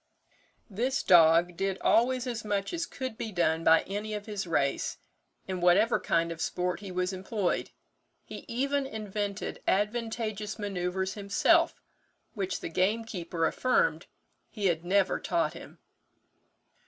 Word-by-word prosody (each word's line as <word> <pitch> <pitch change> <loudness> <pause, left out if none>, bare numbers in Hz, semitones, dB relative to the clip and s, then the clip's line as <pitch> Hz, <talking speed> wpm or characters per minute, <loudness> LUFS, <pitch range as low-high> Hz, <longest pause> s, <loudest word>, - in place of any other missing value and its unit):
"This 245 +6 -1
dog 170 0 +6
did 195 -1 -1
always 250 +2 +3
as 235 -3 -4
much 205 - -2
as 340 0 -2
could 260 -5 -6
be 220 - -4
done 165 -3 +1
by 160 0 +5
any 210 +2 -4
of 205 -1 -6
his 205 -4 -4
race, 140 -4 0 0.5
in 185 -2 -3
whatever 195 +7 +4
kind 170 0 +1
of 165 0 -6
sport 180 0 -1
he 200 -2 -8
was 180 +1 -1
employed; 190 0 -2 0.6
he - - -9
even 275 +3 0
invented 205 -3 -4
advantageous 215 0 -1
manoeuvres 190 -2 -2
himself, 200 -1 +2 0.5
which 195 -4 -3
the - - -4
gamekeeper 185 -2 -1
affirmed 465 - +1 0.4
he 210 -3 -5
had 170 -3 +1
never 190 +2 +2
taught - - 0
him. - - -11
200 Hz, 135 wpm, -29 LUFS, 180-220 Hz, 0.6 s, dog